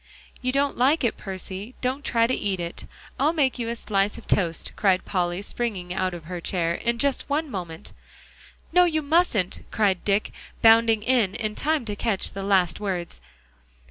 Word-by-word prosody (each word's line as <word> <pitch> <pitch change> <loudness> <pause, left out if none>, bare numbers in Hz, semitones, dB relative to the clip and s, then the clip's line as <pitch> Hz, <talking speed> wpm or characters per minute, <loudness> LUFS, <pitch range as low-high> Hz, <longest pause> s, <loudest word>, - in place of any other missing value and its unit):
"You 255 0 0
don't 275 0 0
like 275 +5 +3
it, 235 - +1
Percy; 195 +4 -7
don't 260 +3 -1
try 230 -1 +2
to 250 - 0
eat 195 -5 -1
it. 170 0 -5 0.3
I'll 295 +4 +3
make 270 -6 +1
you 235 - -2
a 235 - -2
slice 205 -2 0
of - - -11
toast," 170 -4 0
cried 190 -3 +2
Polly, 180 0 -1
springing 200 -6 -3
out 185 -1 -1
of 170 - -9
her 175 +2 -6
chair, 170 -2 0
"in 235 +6 -1
just 280 +3 0
one 295 0 -1
moment." 170 -5 -6 0.8
"No, 360 0 +6
you 315 -3 0
mustn't," 285 - +2
cried 195 -5 +1
Dick, 200 +1 +1 0.3
bounding 225 -1 +6
in 230 -5 +2
in 215 -2 -2
time 300 +1 0
to 210 -2 -3
catch 205 -2 -1
the 195 - -6
last 195 -3 +2
words. 180 - -4
210 Hz, 180 wpm, -25 LUFS, 185-255 Hz, 0.8 s, No